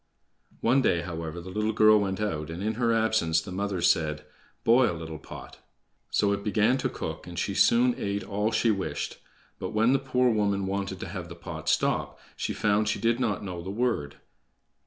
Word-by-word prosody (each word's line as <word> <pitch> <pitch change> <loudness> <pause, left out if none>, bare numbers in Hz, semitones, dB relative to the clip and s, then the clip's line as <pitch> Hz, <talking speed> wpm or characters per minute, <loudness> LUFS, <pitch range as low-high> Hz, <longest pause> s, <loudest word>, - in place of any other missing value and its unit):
One 130 +4 +4
day, 85 -9 +2
however, 85 -1 -5
the 90 +2 -8
little 105 +2 0
girl 110 0 +6
went 95 -1 -2
out, 80 -8 -2
and 85 +4 -5
in 110 +1 0
her 115 +1 +1
absence 110 -8 +2
the 85 - -8
mother 95 -1 -2
said: 75 -1 +2 0.4
"Boil, 120 -5 +4
little 80 -1 -7
pot!" - - -11 0.5
So 100 -1 +2
it 100 0 -2
began 110 +4 +2
to - - 0
cook, - - -6
and - - -8
she - - -1
soon 125 +1 +4
ate 100 0 -2
all 105 +2 -1
she 115 0 +3
wished; 80 -8 -3 0.4
but - - -5
when 110 +4 +3
the 135 - +3
poor 125 -2 +2
woman 100 -3 +1
wanted 95 -1 -3
to - - -4
have 90 -2 -6
the 85 - -8
pot 85 - -6
stop, - - 0 0.2
she - - -3
found 105 0 +1
she 105 - -1
did 115 +1 +1
not 110 -6 -1
know 90 -3 -5
the 90 - -7
word. 105 -9 -1
100 Hz, 200 wpm, -27 LUFS, 85-110 Hz, 0.5 s, girl